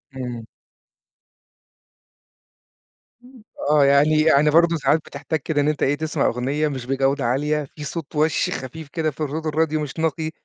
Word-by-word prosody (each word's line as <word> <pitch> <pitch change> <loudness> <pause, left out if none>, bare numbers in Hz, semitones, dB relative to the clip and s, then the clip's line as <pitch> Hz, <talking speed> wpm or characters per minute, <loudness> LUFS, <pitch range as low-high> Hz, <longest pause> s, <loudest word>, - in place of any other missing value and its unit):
إمم. 120 -3 -6 2.8
إمم، 250 -3 -17 0.3
آه 150 -2 +5
يعني 145 +2 +4
يعني 150 -1 +4
برضه 170 +2 +4
ساعات 155 0 +2
بتحتاج 150 +2 -4
كده 145 +1 -1
إن 145 - 0
أنت 150 -1 0
إيه 140 +2 +2
تسمع 155 +1 -1
أغنية 140 +6 0
مش 130 -4 -5
بجودة 135 0 0
عالية 150 +5 0
في 150 - -8
صوت 160 0 -6
وَش 155 +1 +1
خفيف 145 +4 -6
كده 155 -1 -1
في 145 - -12
الرود 155 +2 -3
الراديو 155 0 0
مش 150 +2 -6
نقي. 160 0 -1
150 Hz, 155 wpm, -22 LUFS, 140-160 Hz, 2.8 s, آه